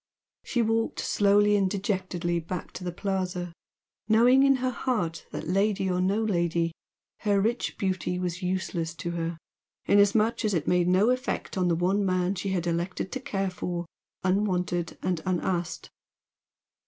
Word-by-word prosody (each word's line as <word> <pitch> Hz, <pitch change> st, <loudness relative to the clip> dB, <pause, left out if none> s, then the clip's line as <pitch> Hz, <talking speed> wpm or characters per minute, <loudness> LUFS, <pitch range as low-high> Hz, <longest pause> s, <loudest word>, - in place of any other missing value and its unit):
She 240 Hz, -2 st, 0 dB
walked 225 Hz, 0 st, 0 dB
slowly 205 Hz, +1 st, +3 dB
and 195 Hz, -2 st, +2 dB
dejectedly 185 Hz, -3 st, -1 dB
back 170 Hz, +2 st, -6 dB
to -, -, -8 dB
the 180 Hz, -, -2 dB
Plaza, 180 Hz, -2 st, -3 dB, 0.6 s
knowing 245 Hz, +4 st, +6 dB
in 275 Hz, 0 st, +5 dB
her 255 Hz, 0 st, -1 dB
heart 180 Hz, -11 st, -2 dB
that -, -, -6 dB
lady 195 Hz, +1 st, +1 dB
or 180 Hz, 0 st, +1 dB
no 200 Hz, +4 st, +1 dB
lady, 170 Hz, -4 st, +1 dB, 0.5 s
her 205 Hz, -2 st, +2 dB
rich 230 Hz, +5 st, -1 dB
beauty 185 Hz, -3 st, -1 dB
was 180 Hz, 0 st, -3 dB
useless 180 Hz, -3 st, -2 dB
to 170 Hz, -, -4 dB
her, 165 Hz, -1 st, -3 dB, 0.5 s
inasmuch 210 Hz, +3 st, +3 dB
as 210 Hz, -3 st, +1 dB
it 165 Hz, -, -1 dB
made 180 Hz, -1 st, +3 dB
no 190 Hz, +6 st, +4 dB
effect 255 Hz, 0 st, -2 dB
on 185 Hz, -2 st, +1 dB
the 170 Hz, -, +2 dB
one 185 Hz, +4 st, +1 dB
man 185 Hz, 0 st, +1 dB
she 195 Hz, +1 st, -3 dB
had 180 Hz, -3 st, -1 dB
elected 175 Hz, +2 st, -2 dB
to 265 Hz, -, -3 dB
care 195 Hz, -6 st, -2 dB
for, 175 Hz, -1 st, -4 dB, 0.4 s
unwanted 180 Hz, -3 st, 0 dB
and 180 Hz, -3 st, 0 dB
unasked. 175 Hz, -2 st, -2 dB
185 Hz, 155 wpm, -27 LUFS, 175-205 Hz, 0.6 s, knowing